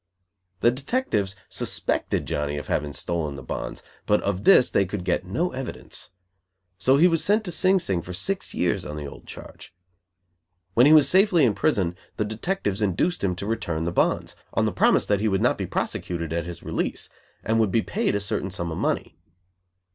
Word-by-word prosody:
The 120 - +5
detectives 125 - -1
suspected - - -1
Johnny 75 0 -2
of 75 - -5
having 75 0 -1
stolen 75 -1 -2
the 65 - -9
bonds, - - -5 0.2
but 105 - +4
of 100 -1 -2
this 190 -10 +6
they - - +3
could 95 -1 -5
get 90 0 0
no 170 - -1
evidence. 130 -1 -6 0.7
So 130 +1 +4
he 170 +5 +6
was 165 -2 +2
sent 210 +2 +3
to 180 - -4
Sing 190 +3 +4
Sing 95 - -1
for 90 - -9
six 190 - -3
years - - 0
on 75 - -6
the 75 - -5
old 70 - -11
charge. - - -11 1.0
When 120 +6 +6
he - - +6
was 155 -3 +7
safely 185 -5 +5
in 110 - +3
prison 95 - 0 0.2
the 105 - 0
detectives 110 - -2
induced 105 - 0
him 90 -2 +1
to 95 - -5
return 100 -8 -2
the 85 - -1
bonds, - - 0 0.2
on - - +2
the - - +1
promise - - +3
that 100 -1 +1
he 110 - 0
would 95 -2 +1
not - - +3
be - - -4
prosecuted 85 -2 -3
at 85 0 -2
his 85 -2 -8
release, - - -3 0.4
and 110 +1 +1
would 110 -4 +2
be 110 - +2
paid 220 - -1
a - - +1
certain 100 -1 -1
sum 85 -3 -4
of 80 - -4
money. - - -2
105 Hz, 200 wpm, -24 LUFS, 85-145 Hz, 1.0 s, was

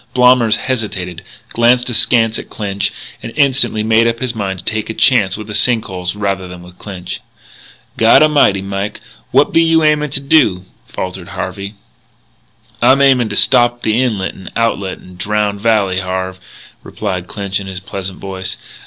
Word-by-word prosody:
Blommers 125 -3 +5
hesitated, 95 -9 -3 0.3
glanced 120 +1 +2
askance 115 -1 +2
at - - -10
Clinch, 100 -2 -2 0.3
and - - -7
instantly 135 -7 +2
made 110 +1 +3
up 115 0 0
his 125 -1 -3
mind 100 -4 -3
to 90 - -11
take 110 0 -2
a 110 - -4
chance 105 -9 +3
with 105 - -7
the 105 - -7
sink 110 +2 +1
holes 90 0 -4
rather 100 -2 -2
than 90 -1 -10
with 90 0 -16
Clinch. 90 -3 -7 0.8
"God 115 +6 +6
A'mighty, 140 -11 +3
Mike, 100 +1 -4 0.3
what - - +3
be 165 - +5
you 165 -1 +3
aimin' 150 -1 +2
to 135 - -1
do?" 125 - +2 0.2
faltered 95 -1 -6
Harvey. 100 +3 -6 1.1
"I'm 135 +1 +5
aimin' 130 -5 +4
to 100 - -3
stop 120 0 +3
the 110 +3 +2
inlet 105 -7 -1
and 95 - -10
outlet 100 -5 -1
to - - -17
Drowned 100 +2 -2
Valley, 100 -5 +2
Harve," 95 0 -4 0.4
replied 95 -4 -4
Clinch 100 -1 -3
in 100 - -8
his 95 -1 -5
pleasant 95 0 -6
voice. 95 -1 -5
105 Hz, 170 wpm, -15 LUFS, 95-120 Hz, 1.1 s, God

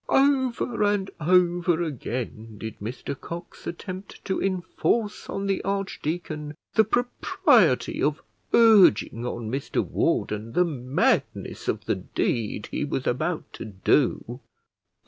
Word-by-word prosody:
Over 260 -4 +2
and 205 -2 +1
over 175 0 +3
again 115 -6 -5
did 110 +1 -7
Mr 125 +6 -5
Cox 170 +5 -9
attempt 185 +2 -7
to 190 - -1
enforce 195 +4 -1
on 195 - -3
the 195 -1 0
archdeacon 165 -6 -3 0.2
the 220 - +6
propriety 245 +3 +2
of - - +1 0.3
urging 195 - +5
on 115 -2 -4
Mr 135 +2 -1
Warden 105 +2 -1
the 180 - +4
madness 130 -4 -1
of - - -1
the - - +1
deed 105 -2 -2
he - - -1
was 135 -2 -2
about 155 +7 -2
to - - -7
do. 120 +4 +1
170 Hz, 120 wpm, -25 LUFS, 125-195 Hz, 0.3 s, the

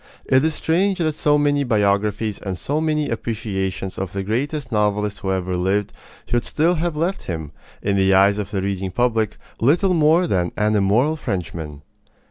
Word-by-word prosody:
It 130 +1 +3
is 160 -1 +1
strange 185 +4 +1
that 160 -4 0
so 150 0 +2
many 145 -1 +2
biographies 105 -2 0
and 95 -2 -4
so 145 - -1
many 155 -2 0
appreciations 100 -5 -3
of 95 -2 -4
the 100 0 -2
greatest 130 +6 -2
novelist 105 -1 0
who 95 -2 -2
ever 95 -1 -1
lived 95 +3 0 0.3
should 120 0 0
still 165 +4 +1
have 170 -1 -1
left 170 +5 -2
him, 80 -4 -5 0.3
in 100 -1 +1
the 95 0 +3
eyes 100 +2 +4
of 100 -1 -4
the 100 -2 -2
reading 95 -1 -2
public, 110 0 0 0.2
little 175 - +3
more 165 +2 +4
than 90 - 0
"an 105 +1 +2
immoral 110 +10 +2
Frenchman." 80 - -5
105 Hz, 175 wpm, -21 LUFS, 95-150 Hz, 0.3 s, eyes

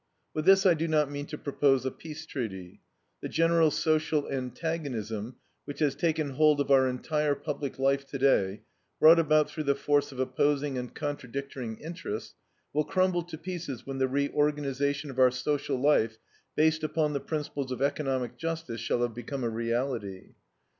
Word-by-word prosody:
With 155 0 -2
this 195 0 +6
I 185 - +7
do 165 +1 -1
not 150 -3 +2
mean 145 0 -5
to 150 - -6
propose 135 -3 +1
a 130 - 0
peace 155 +2 -9
treaty. 95 - -6 0.4
The - - -4
general 165 -1 +4
social 155 -1 +1
antagonism 125 -5 -3 0.3
which 145 - -7
has 145 -2 +2
taken 155 -4 0
hold 150 +2 +4
of 140 - 0
our 130 -1 +6
entire 145 +3 0
public 145 -2 -4
life 135 +1 +1
today, 130 -9 +1 0.4
brought 165 +2 +8
about 155 -1 +4
through 155 -5 -4
the 140 0 +3
force 145 +1 +1
of 130 - -10
opposing 140 +2 +1
and 125 -1 -4
contradictory 135 -3 -4
interests, 160 - -6 0.4
will 150 +1 +2
crumble 185 +2 +1
to 170 -1 -8
pieces 165 -8 -6
when 135 -1 -5
the 130 - +3
reorganization 140 +1 0
of 130 - -6
our 130 -1 +7
social 135 +2 -1
life, 115 -6 +3 0.4
based 155 0 +3
upon 155 -1 0
the 140 - 0
principles 145 -3 -4
of 130 +1 -2
economic 135 -3 -1
justice, 165 -8 -4
shall 120 +1 0
have 120 -1 -1
become 120 +3 -5
a 115 - 0
reality. 115 -3 -3
140 Hz, 165 wpm, -29 LUFS, 130-155 Hz, 0.4 s, brought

